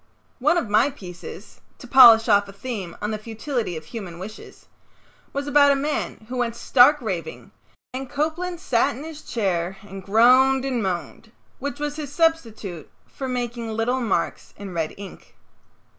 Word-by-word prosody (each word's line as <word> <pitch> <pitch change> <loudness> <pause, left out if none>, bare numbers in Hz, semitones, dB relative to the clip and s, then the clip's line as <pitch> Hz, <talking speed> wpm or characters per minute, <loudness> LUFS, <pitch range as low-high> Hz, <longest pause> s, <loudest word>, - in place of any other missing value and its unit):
One 305 +7 +3
of 330 - -1
my 215 +6 +3
pieces 185 -5 -11 0.2
(to - - -12
polish 235 -3 +8
off 205 -2 +4
a - - -9
theme 200 -6 -6
on 210 - -1
the 215 - -3
futility 225 - -4
of 155 - -9
human 185 -3 -8
wishes) 200 +5 -10 0.7
was 280 0 -3
about 285 0 +5
a - - +3
man 280 -5 -3
who 255 +1 -5
went 235 -2 -1
stark 265 +5 +5
raving, 180 - -5 0.4
and 260 0 -5
Copeland 325 +4 -2
sat 235 -10 +1
in 270 - -8
his 315 -1 -9
chair 190 - -2
and 195 -1 -9
groaned 255 +6 +5
and 255 -3 -1
moaned, 190 +3 -4 0.3
which 285 +1 -5
was 295 0 -3
his 295 -3 -6
substitute 230 - -1 0.2
for 265 - -7
making 240 -2 -3
little 225 +4 -1
marks 195 -7 -2
in 195 -2 -8
red 165 -2 -2
ink. 200 -1 -12
235 Hz, 165 wpm, -23 LUFS, 200-275 Hz, 0.7 s, polish